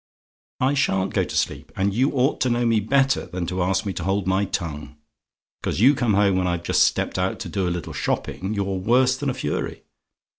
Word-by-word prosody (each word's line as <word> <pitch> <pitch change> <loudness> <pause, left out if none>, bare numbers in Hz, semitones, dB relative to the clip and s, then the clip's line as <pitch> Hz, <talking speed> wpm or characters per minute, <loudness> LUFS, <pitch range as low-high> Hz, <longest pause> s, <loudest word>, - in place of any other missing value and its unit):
"I 130 +2 +2
SHA'N'T 95 -9 0
go - - +2
to - - -6
sleep; - - -2
and 100 +1 0
you 130 +6 +2
ought 135 +2 +1
to 130 - +2
know 120 0 +1
me 115 -2 +3
better 135 +5 +1
than 90 -1 -4
to 90 +2 -2
ask 95 +2 0
me 100 - -2
to 85 - -5
hold 95 +1 0
my 95 +2 +1
tongue. 75 -6 -5 0.7
Because - - -2
you 130 +7 +6
come 120 -6 +1
home 100 -2 +3
when 90 -1 +1
I've 85 -1 -2
just - - +4
stepped - - -1
out 95 +1 0
to - - -5
do 95 -3 -1
a - - +1
little 85 -2 -4
shopping, 100 +3 -2
you're 100 -1 -1
worse 125 +6 +3
than 140 +1 -2
a 130 - -2
fury. 75 - -3
100 Hz, 225 wpm, -23 LUFS, 90-125 Hz, 0.7 s, you